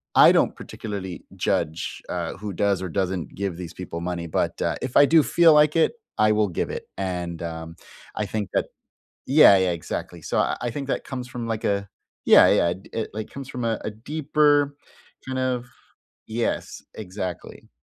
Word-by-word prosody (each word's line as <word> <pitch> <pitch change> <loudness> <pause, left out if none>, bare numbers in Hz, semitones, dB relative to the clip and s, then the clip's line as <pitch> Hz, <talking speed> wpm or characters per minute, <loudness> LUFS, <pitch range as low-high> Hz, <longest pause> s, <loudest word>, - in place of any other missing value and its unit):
I - - +9
don't - - +2
particularly 100 -5 -7
judge, 80 +2 -2
uh, - - -3
who 105 +1 -5
does 100 0 +1
or 95 - -4
doesn't 95 -2 -2
give 95 -3 -3
these 90 -2 -7
people 85 -2 -6
money, 85 -1 -3
but, - - -1
uh, - - 0
if 125 -1 -1
I 145 - +8
do 160 +1 +6
feel 170 -2 +5
like 150 +1 +5
it, 165 - +4 0.3
I 110 0 +4
will 105 -1 +2
give 90 - -2
it, - - -6
and, 90 -3 -3
um, 80 0 -6 0.4
I 105 - -1
think 105 +1 -3
that - - +1 0.6
Yeah, 135 -7 +8
yeah, 95 -1 +2
exactly. 85 -1 -5
So - - -2
I - - -1
I - - -1
think 140 +3 -5
that - - -1
comes 125 -2 -6
from, 120 -2 -5
like, 115 -1 -3
a 100 -1 0 0.4
Yeah, - - +8
yeah, 85 - +3 0.2
it, 115 - -3
like, 110 0 -5
comes 135 -1 -8
from 125 - -5
a 115 -1 -2
deeper 145 -1 +2 0.5
kind 130 0 -3
of 125 -1 -1 0.6
Yes, 115 +1 -3
exactly. 95 -4 -7
105 Hz, 180 wpm, -24 LUFS, 90-130 Hz, 0.6 s, I